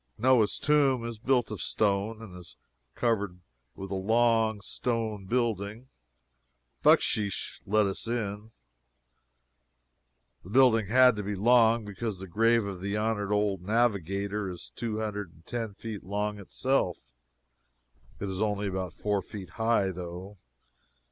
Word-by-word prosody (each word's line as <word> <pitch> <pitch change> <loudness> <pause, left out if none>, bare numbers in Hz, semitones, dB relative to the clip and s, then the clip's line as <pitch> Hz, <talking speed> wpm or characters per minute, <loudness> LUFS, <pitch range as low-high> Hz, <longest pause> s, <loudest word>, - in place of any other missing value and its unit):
Noah's 120 -2 +3
tomb 140 -5 +2
is 115 -2 -6
built 125 -1 +1
of 105 -6 -5
stone, 110 +2 0
and 95 -5 -10
is 90 -2 -11 0.4
covered 100 -6 0 0.4
with 95 0 -7
a - - -1
long 110 +2 +2
stone 110 -2 -2
building. 115 0 -1 0.9
Bucksheesh 100 -3 +2
let 105 +1 +3
us 100 +3 -3
in. 105 -2 -3 1.9
The 90 - -12
building 115 -3 +4
had 125 +2 +6
to - - -1
be 100 +1 -3
long, 115 +1 +4
because 105 0 -4
the 95 - -7
grave 115 +4 +2
of 95 -3 -6
the 100 +2 -2
honored 105 -2 -1
old 105 -3 +1
navigator 100 -1 0
is 90 -1 -9
two 115 -2 -3
hundred 105 -5 -4
and 80 +1 -22
ten 115 -4 -4
feet 110 -2 -7
long 105 +1 -2
itself! 100 - -1 1.1
It 100 - -3
is 95 +1 -4
only 105 -1 0
about 95 -3 -4
four 105 -1 0
feet 95 -6 -9
high, 110 -3 +1
though. 90 +2 -8
105 Hz, 135 wpm, -28 LUFS, 100-115 Hz, 1.9 s, had